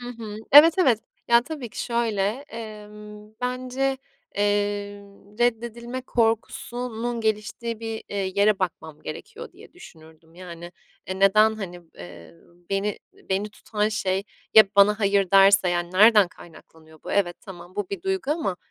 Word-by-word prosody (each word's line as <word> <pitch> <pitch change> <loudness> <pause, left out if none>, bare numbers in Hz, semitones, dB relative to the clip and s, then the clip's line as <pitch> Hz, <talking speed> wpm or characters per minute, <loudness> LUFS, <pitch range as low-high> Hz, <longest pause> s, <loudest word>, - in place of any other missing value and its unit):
Hı 245 - -8
hı, 225 -3 -8 0.2
evet, 310 +4 +9
evet. 250 - +3 0.3
Ya, 235 0 +5
tabii 285 -4 -7
ki - - -5
şöyle, 230 -4 -1 0.3
emm, 210 -1 -10
bence, 255 +2 -2 0.4
eee, 205 - +1 1.0
reddedilme 240 +1 -2
korkusunun 235 0 -2
geliştiği 220 +1 -3
bir, 225 -1 -5
eee, 195 -2 -3
yere 200 0 +3
bakmam 165 -5 -5
gerekiyor 460 - -9
diye - - -16
düşünürdüm, 160 - -17
yani, 175 -1 -10 0.3
e 190 +1 -5
neden, 215 +3 +5
hani, 180 -5 -8
eee, 85 - -12 0.4
beni 195 +1 -1
beni 195 +2 -3
tutan 210 0 -2
şey 195 -3 -1 0.3
Ya, 220 - +10
bana 205 +1 +5
hayır 200 -2 +2
derse, 195 -1 +6
yani, 175 0 -1
nereden 210 0 +6
kaynaklanıyor 160 -2 -17
bu? - - -5
Evet, 175 -4 +1
tamam 180 -2 -12
bu 205 -3 -3
bir 200 - -5
duygu 380 -7 -2
ama 300 - -1
210 Hz, 140 wpm, -24 LUFS, 190-235 Hz, 1.0 s, Ya